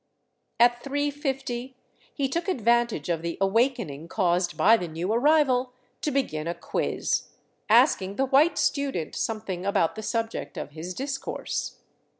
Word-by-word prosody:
At 240 0 +5
3 285 +1 0
150 265 -3 -4 0.4
he 280 -2 -1
took 335 +8 -2
advantage 235 - +1
of 170 -2 -1
the 170 0 -4
awakening 195 - 0
caused 175 -2 0
by 220 +3 +6
the 180 -6 -3
new 170 +6 -2
arrival 260 -1 +3 0.3
to - - 0
begin 170 - -1
a 170 - -2
quiz, - - -1 0.4
asking 215 -5 +4
the 270 - +1
white 285 +6 +4
student 275 - 0
some 220 -1 -2
thing 185 -4 -5
about 195 -4 +1
the 220 - -7
subject 225 +1 -3
of - - -5
his 165 +4 -7
discourse. 270 0 -4
230 Hz, 150 wpm, -26 LUFS, 180-270 Hz, 0.4 s, by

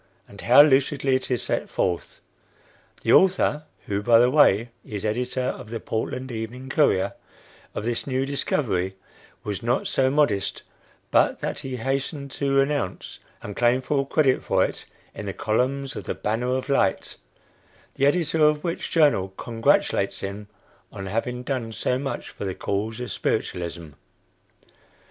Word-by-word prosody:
and 100 - -12
how 125 +4 +8
lucidly 135 -1 +2
it 130 - -2
is 125 -2 0
set - - -2
forth! 90 -2 -2 0.8
The - - +3
author 180 -5 +4 0.2
(who, 100 0 -2
by 115 +2 +5
the 120 +2 +5
way, 120 -6 +4
is 105 -1 -6
editor 125 +4 -1
of 115 -4 -4
the 115 0 -4
"Portland 130 +4 -3
Evening 120 +3 -6
Courier") 135 -10 +2 0.6
of 105 - -3
this 120 +2 -2
new 130 0 0
discovery, 105 -9 -1 0.5
was 105 +1 -4
not 120 +2 0
so 130 -1 +2
modest 130 -9 +1 0.5
but - - +3
that - - -3
he 130 -1 -5
hastened 135 +3 -3
to 135 0 +2
announce 140 -9 -3 0.2
and 105 - -6
claim 120 +1 +3
full 140 -1 0
credit 140 -3 +2
for - - +2
it - - -6 0.3
in 105 - -7
the 95 - -3
columns 130 +7 -1
of 105 - -6
the - - -3
"Banner 120 +4 -1
of 130 - -3
Light" 135 -9 0 0.8
the 140 - +2
editor 160 0 +2
of 150 0 +3
which 170 -1 -3
journal 145 - +3
congratulates 115 -2 +1
him 100 +1 -6 0.4
on 95 - -7
having 120 +5 -3
done 125 -4 -3
so 125 +3 -1
much 135 0 -4
for - - -8
the 95 -2 -3
cause 110 +3 -3
of 125 - -5
spiritualism! 85 -2 -3
125 Hz, 155 wpm, -24 LUFS, 105-140 Hz, 0.8 s, how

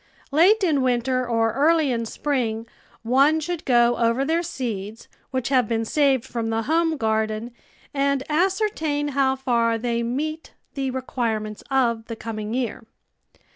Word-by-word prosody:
Late 380 +9 +5
in 305 -7 +2
winter 255 0 +1
or 225 -1 +1
early 305 +2 +3
in 230 -2 -2
spring 230 -5 -2 0.4
one 275 +7 +4
should 335 +1 -4
go 240 -1 +4
over 235 +3 +1
their 325 +3 +1
seeds 225 - -5 0.2
which 260 -1 -2
have 255 -4 +3
been 225 0 -1
saved 275 -1 +2
from 230 -2 -3
the 225 0 -1
home 325 +3 +1
garden 220 0 -1 0.4
and 280 -1 +1
ascertain 320 -4 0
how 270 -1 +2
far 235 -3 +1
they 235 0 -1
meet 300 +7 -3 0.2
the 270 -2 -2
requirements 230 -5 -3
of 235 -4 +1
the 230 - -5
coming 220 0 -5
year. 250 -4 -2
255 Hz, 145 wpm, -23 LUFS, 230-290 Hz, 0.4 s, Late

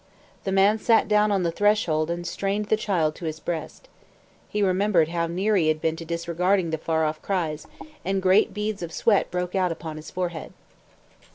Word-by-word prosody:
The 195 - -1
man 195 +3 +4
sat 225 +1 +3
down 210 0 +3
on 195 -2 +1
the 170 - 0
threshold 170 -5 +1
and 175 0 -3
strained 200 +4 -2
the - - +4
child 180 -8 0
to 170 - -7
his 160 0 -4
breast. 170 - -5 0.6
He 210 0 0
remembered 185 -3 +2
how 170 0 -1
near 190 +6 0
he 170 -5 +3
had 155 0 +1
been 160 0 0
to 165 - -7
disregarding 170 +2 0
the 160 - -2
far 160 0 0
off 155 0 -3
cries, 165 -6 -2 0.4
and 195 +1 0
great 190 +3 +4
beads 210 -1 -3
of 170 -1 -5
sweat 205 +4 +2
broke 180 0 -3
out 185 -2 +1
upon 160 -1 -6
his 155 0 -9
forehead. 175 -3 -4
180 Hz, 195 wpm, -25 LUFS, 160-200 Hz, 0.6 s, man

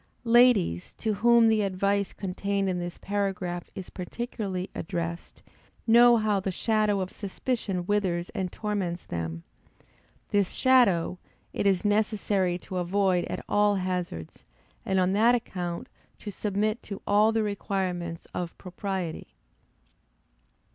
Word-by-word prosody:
Ladies, 230 - +4
to 220 -2 -1
whom 235 +2 +5
the 220 -1 +3
advice 200 0 0
contained 195 +1 -2
in 180 -1 -1
this 175 0 -5
paragraph 195 -3 -2
is 190 - -7
particularly 195 -1 -4
addressed, 170 -1 -5 0.4
know 235 +1 +7
how 215 -2 +1
the 190 - -2
shadow 215 0 +1
of 185 - -4
suspicion 200 -2 -3
withers 185 -4 0
and 190 -4 -3
torments 195 -5 -3
them. 85 0 -4 0.9
This 200 -3 +1
shadow, 200 -10 +3 0.3
it - - 0
is 195 0 +2
necessary 205 -3 +1
to 185 +1 -7
avoid 180 0 +1
at - - -5
all 205 0 +3
hazards, 180 - -4 0.4
and 190 -1 +2
on 185 +1 +2
that 230 +4 +5
account 180 -7 -4 0.3
to 210 - -7
submit 210 +3 -1
to 200 -2 -7
all 210 +2 +4
the 225 -1 +1
requirements 185 -5 -3
of 175 -2 -4
propriety. 185 -2 -5
195 Hz, 125 wpm, -27 LUFS, 180-210 Hz, 0.9 s, know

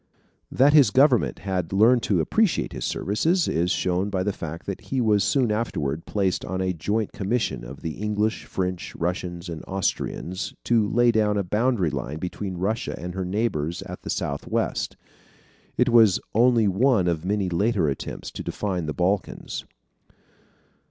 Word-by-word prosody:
That 140 +3 +4
his 145 -7 +7
government 130 +1 +3
had 90 -4 -2
learned 115 +5 +5
to - - +3
appreciate 220 -5 +1
his - - -4
services 160 - +1
is 85 +2 +1
shown 90 +3 0
by 95 -2 -1
the 105 +1 -1
fact 85 -1 -7
that 100 - -5
he 135 - -3
was 105 -4 +3
soon 130 -5 +2
afterward 80 -9 -2
placed 95 -3 0
on 95 +1 -3
a 95 0 0
joint 105 +7 -1
commission 100 - -1
of 65 +4 -9
the 80 - -2
English, 105 +1 -1
French, 90 -1 -3
Russians, 90 0 -3
and 80 -2 -6
Austrians, 95 -1 -3
to 110 -3 +2
lay 120 0 +4
down 105 -2 +2
a 100 - +1
boundary 105 - +1
line 70 +1 -4
between 90 +2 -5
Russia 105 +6 -2
and 90 +1 -6
her 95 0 -3
neighbors 90 -5 -1
at - - -8
the - - -8
southwest. 70 0 -2 0.8
It 125 0 +3
was 115 -6 +6
only 115 -1 +4
one 100 -1 +3
of 85 -2 0
many 100 +1 0
later 95 0 +1
attempts 70 - -4
to - - -6
define 90 -6 -3
the 75 - -2
Balkans. 95 +4 -2
100 Hz, 165 wpm, -24 LUFS, 90-115 Hz, 0.8 s, his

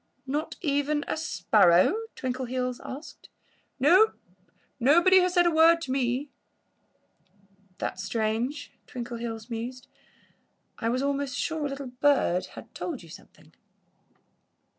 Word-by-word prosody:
"Not 290 +3 -3
even 290 -1 0
a - - -1
sparrow?" 200 - +3 0.2
Twinkleheels 255 -1 -3
asked. 280 +5 -10 0.5
"No! 365 - +5 0.7
Nobody 340 +9 +6
has 365 0 +1
said 350 0 +5
a 345 - +4
word 330 +1 +5
to 270 - -4
me." 260 +2 -1 1.5
"That's 185 - -4
strange," 225 +7 -2 0.2
Twinkleheels 235 -1 -6
mused. 245 +3 -5 0.9
"I 230 - -1
was 255 +3 0
almost 280 -2 -1
sure 315 -2 -2
a - - -6
little 275 0 -6 0.2
bird 270 -11 +2
had - - -11
told 300 - -5
you 165 - -14
something." - - -16
265 Hz, 120 wpm, -27 LUFS, 235-300 Hz, 1.5 s, Nobody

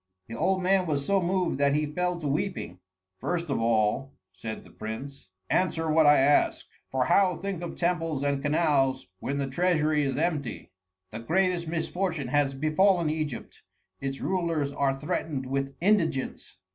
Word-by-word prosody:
The 115 - -7
old 185 +9 +1
man 185 0 +3
was 140 -3 -1
so 195 +3 +2
moved 180 -4 0
that 140 0 +3
he 150 0 +1
fell 180 +4 -2
to 155 - -3
weeping. 145 - -2 0.4
"First 170 - -2
of 125 - 0
all," 115 +4 +1 0.2
said 110 +4 -7
the - - -17
prince, 110 +1 -7 0.2
"answer 165 - +1
what 155 -1 +5
I 145 - +7
ask; 145 +2 +3 0.2
for 130 -1 0
how 185 +1 +3
think 195 -3 -4
of 175 - -5
temples 165 -5 -1
and 140 -1 0
canals 145 - +2
when 140 +1 -3
the 140 - 0
treasury 155 +1 +1
is 135 -2 -1
empty? 150 -8 -2 0.4
The 110 - -6
greatest 175 +6 +1
misfortune 165 -3 -2
has 140 0 +1
befallen 160 +3 +3
Egypt: 155 -6 -5 0.4
its 135 0 -4
rulers 165 -6 -1
are 135 -1 0
threatened 145 -1 -2
with 135 +1 -2
indigence. 170 -8 0
150 Hz, 160 wpm, -27 LUFS, 135-175 Hz, 0.4 s, I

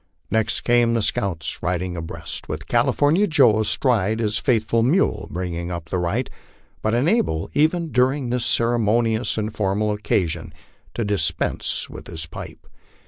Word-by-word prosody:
Next 110 +1 +1
came 120 -1 +3
the 115 - +1
scouts 85 -7 -1
riding 90 0 -2
abreast, 80 -3 -6
with - - -4
California 160 +8 +2
Joe 115 - +4
astride 110 -1 +1
his 110 -1 0
faithful 115 -2 +1
mule 120 - +1
bringing 85 -1 -4
up 85 -2 -6
the 95 - 0
right, 100 +9 -1 0.5
but 110 +1 +1
unable, 125 - +1
even 160 +2 +1
during 130 0 +1
this 125 -1 0
ceremonious 115 0 +1
and 110 0 -2
formal 105 +1 0
occa 105 -3 +1
ion, 80 -1 -10 0.4
to 115 - -1
dispense 85 -6 0
with - - -10
his 80 -1 -5
pipe. 80 - -10
110 Hz, 145 wpm, -22 LUFS, 90-120 Hz, 0.5 s, Joe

